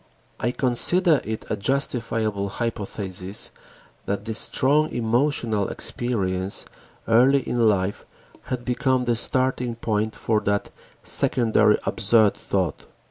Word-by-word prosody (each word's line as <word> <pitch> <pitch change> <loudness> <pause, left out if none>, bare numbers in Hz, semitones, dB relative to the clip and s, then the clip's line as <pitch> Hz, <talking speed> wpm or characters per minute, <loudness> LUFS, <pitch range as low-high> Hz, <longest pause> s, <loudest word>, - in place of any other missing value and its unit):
I 120 - -1
considered 145 +6 +4
it 110 0 -5
a - - +1
justifiable 110 -3 -1
hypothesis 100 -3 -2 0.6
that 100 +1 -3
this 110 -1 +3
strong 150 +4 +2
emotional 115 -3 -1
experience 95 -6 -2 0.4
early 130 +4 +3
in 115 -2 +2
life 100 -1 -1 0.4
had 125 -1 -5
become 130 0 0
the 120 -1 +1
starting 125 0 0
point 110 -1 -2
for 110 -2 0
that 100 -1 -2 0.3
secondary 110 -3 +3
absurd 110 -1 +2
thought. 95 -6 -3
115 Hz, 110 wpm, -23 LUFS, 100-125 Hz, 0.6 s, considered